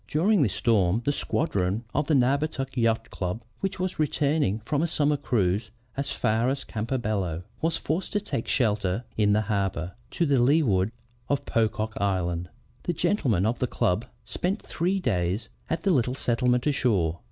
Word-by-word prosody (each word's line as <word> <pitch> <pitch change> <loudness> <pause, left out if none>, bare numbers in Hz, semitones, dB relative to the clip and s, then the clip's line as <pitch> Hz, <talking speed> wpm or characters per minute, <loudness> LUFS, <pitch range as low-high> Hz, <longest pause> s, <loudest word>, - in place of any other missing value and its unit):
During 190 +6 +3
this 115 -8 +1
storm 105 -1 +2
the 145 - +3
squadron 105 - 0
of 150 - 0
the 155 - +3
Naugatuck 135 +1 +1
Yacht 115 -2 +1
Club, 90 +5 -3 0.2
which 195 -1 -3
was 185 -2 -2
returning 145 -7 +1
from 145 +6 -1
a 170 - +2
summer 150 -2 +2
cruise 105 -7 0 0.3
as 140 +1 -2
far 110 +3 +1
as 135 0 -2
Campobello, 105 -7 -2 0.2
was 165 +1 +1
forced 165 +5 -2
to 205 - +2
take 195 - -4
shelter 105 -3 +1
in 105 -1 +3
the 105 - +3
harbor 95 -4 -1 0.2
to 170 - 0
the 140 -5 +3
leeward 120 - +3 0.4
of 140 - 0
Pocock 110 -1 0
Island. 90 -3 -1 0.3
The 175 - -1
gentlemen 130 - +1
of 115 +3 0
the 125 - +1
club 100 0 0 0.2
spent 185 - -2
three 185 +4 0
days 105 - -1 0.2
at 165 0 -1
the 195 - +3
little 125 -5 +2
settlement 125 -1 +1
ashore. 100 - +1
120 Hz, 165 wpm, -26 LUFS, 100-145 Hz, 0.4 s, During